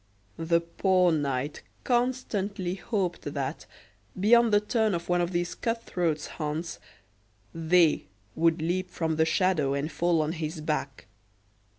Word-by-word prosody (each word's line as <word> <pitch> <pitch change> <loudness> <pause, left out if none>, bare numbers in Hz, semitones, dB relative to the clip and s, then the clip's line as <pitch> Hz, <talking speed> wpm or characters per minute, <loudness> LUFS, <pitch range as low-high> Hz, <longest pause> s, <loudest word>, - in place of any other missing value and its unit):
The 170 +1 +2
poor 180 +1 +2
knight 145 -2 -1 0.2
constantly 215 -7 -1
hoped 190 -2 -2
that, - - -3 0.5
beyond 235 +3 +5
the 205 - +5
turn 215 -1 +1
of 170 +1 -5
one 175 0 +3
of 175 +1 -1
these 175 -1 -1
cut 230 -1 -2
throats' 165 -7 -1
haunts, 155 +2 -4 0.7
"they" 165 0 +3 0.3
would 165 0 +2
leap 180 +2 -1
from 160 -3 -2
the 160 - +4
shadow 160 -6 +1
and 145 +3 -2
fall 165 +2 +2
on 155 - -2
his 160 -1 -4
back. 150 -3 -3
170 Hz, 135 wpm, -27 LUFS, 160-190 Hz, 0.7 s, beyond